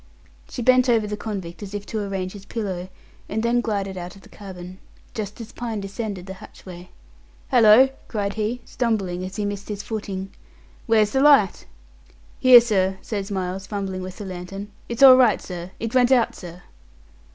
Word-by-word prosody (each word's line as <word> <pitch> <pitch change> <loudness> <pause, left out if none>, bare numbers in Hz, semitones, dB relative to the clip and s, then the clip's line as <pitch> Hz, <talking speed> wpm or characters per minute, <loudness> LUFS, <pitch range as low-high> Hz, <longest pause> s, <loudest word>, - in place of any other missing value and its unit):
She 245 - -5
bent 255 +1 +4
over 225 -3 +3
the 210 0 -4
convict 195 -5 -6
as 205 0 -7
if 205 0 -5
to 220 - -4
arrange 195 -2 -3
his 200 -1 -11
pillow, 190 -5 -4 0.4
and 220 +2 -2
then 240 +1 +2
glided 195 -4 -3
out 175 +1 -8
of 195 - -16
the - - -17
cabin, 185 -2 -10 0.3
just 210 -1 -6
as 230 0 -9
Pine 230 -3 -4
descended 200 -1 -5
the 190 - -7
hatchway. 180 -3 -12 0.6
"Hallo!" 240 +1 +7 0.2
cried 205 -2 -2
he, 220 +3 -3
stumbling, 195 -7 -2
as 185 +1 -7
he 210 - -2
missed 205 0 -5
his 205 -1 -5
footing; 195 -3 -5 0.6
"where's 215 -2 +3
the 265 - +1
light?" 275 -10 +4 0.7
"Here, 250 -2 +9
sir," 195 -5 0
says 200 -2 -4
Miles, 190 -1 -4
fumbling 195 -3 -4
with 185 0 -8
the 205 - -7
lantern. 190 +2 -7 0.2
"It's 235 +3 0
all 260 -1 +10
right, 245 -4 +4
sir. 175 -1 -7
It 230 +1 -4
went 250 0 +4
out, 245 -3 +3
sir." 175 -1 -11
205 Hz, 180 wpm, -23 LUFS, 190-230 Hz, 0.7 s, all